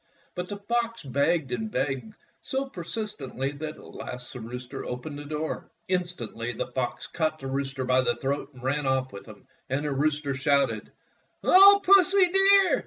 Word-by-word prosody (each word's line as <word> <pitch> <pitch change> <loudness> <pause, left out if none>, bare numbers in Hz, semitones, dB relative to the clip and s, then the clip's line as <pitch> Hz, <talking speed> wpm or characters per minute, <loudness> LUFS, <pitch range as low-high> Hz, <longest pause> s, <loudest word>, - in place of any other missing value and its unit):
But 180 0 -5
the 205 - -4
fox 230 +2 -2
begged 140 +1 +1
and 110 -3 -2
begged 135 - -2 0.3
so 270 +1 -2
persist 215 0 -5
ently 135 +1 -4
that 155 0 -5
at - - -13
last 125 -1 -7
the 125 - -7
rooster 125 +3 -7
opened 145 +4 -6
the 145 - -8
door. 155 +1 -4 0.2
Instantly 170 - -2
the - - -3
fox 125 -1 -3
caught 155 -2 -1
the 135 - -10
rooster 135 0 -2
by 130 0 +3
the 130 - +1
throat 140 +2 -3
and 125 - -13
ran 140 +2 0
oflf 130 -1 0
with 100 +2 -10
him, 105 -2 -13 0.2
and 140 +3 -1
the 145 - -1
rooster 145 0 0
shouted: 135 -5 +1 0.3
— - - -42
"O 400 +2 +8
Pussy, 385 -1 +6
dear. 390 0 +5
140 Hz, 180 wpm, -27 LUFS, 130-190 Hz, 0.3 s, O